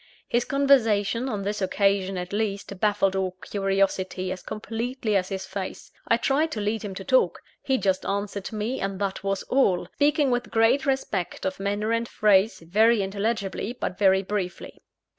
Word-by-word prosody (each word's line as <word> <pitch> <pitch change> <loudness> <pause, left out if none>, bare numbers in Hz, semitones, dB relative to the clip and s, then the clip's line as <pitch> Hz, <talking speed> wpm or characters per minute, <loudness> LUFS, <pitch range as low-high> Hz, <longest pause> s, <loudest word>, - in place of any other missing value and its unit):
His 240 0 +1
conversation, 250 -4 +2
on 205 -4 -3
this 205 +1 -2
occasion 195 0 +1
at 180 +2 -5
least, 200 -2 -2
baffled 205 -2 +2
all 190 -1 -1
curiosity 195 -2 -1
as 185 - -5
completely 225 +1 -3
as 185 -1 +1
his 190 -1 -4
face. 190 0 -6 0.2
I 230 - +4
tried 280 +6 +1
to 215 - -3
lead 210 +1 -1
him 200 -3 -6
to - - -6
talk. - - +2 0.2
He 265 -1 +1
just 190 -5 0
answered 200 0 -3
me, 220 +4 -2
and 195 0 -2
that 195 -1 -2
was 195 -1 -1
all; 225 -9 +2
speaking 290 -1 +2
with 245 0 -1
great 230 +5 +3
respect 215 -12 -2
of 190 0 -2
manner 205 +2 -1
and 230 0 0
phrase, 210 -1 +3
very 215 +6 +3
intelligibly, 200 +2 -2
but 180 - -3
very 190 -1 +4
briefly. 190 -2 -4
205 Hz, 170 wpm, -25 LUFS, 195-230 Hz, 0.2 s, I